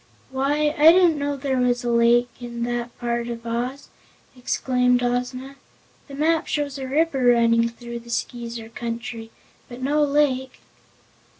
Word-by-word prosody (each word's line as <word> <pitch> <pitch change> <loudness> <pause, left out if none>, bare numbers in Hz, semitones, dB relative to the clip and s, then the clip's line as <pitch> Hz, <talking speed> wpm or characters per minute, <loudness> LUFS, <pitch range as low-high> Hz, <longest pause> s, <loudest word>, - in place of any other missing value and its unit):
"Why, 290 +3 +1
I 310 +2 +9
didn't 345 -4 +4
know 285 0 -1
there 265 -1 -1
was 245 0 +1
a 240 - -1
lake 235 +1 +3
in 235 -1 -5
that 240 0 -3
part 235 -1 -2
of 235 -1 -6
Oz," 245 +4 -4 0.5
exclaimed 250 0 +1
Ozma. 250 +2 -3 0.5
"The 280 - -9
map 315 +2 +1
shows 285 -2 -2
a 265 - -5
river 285 -1 +1
running 230 -1 +4
through 235 0 -8
the 235 0 -15
Skeezer 235 -1 -4
Country, 230 -1 -6 0.4
but 240 0 -9
no 290 +3 +1
lake." 280 -3 0
250 Hz, 145 wpm, -23 LUFS, 235-280 Hz, 0.5 s, I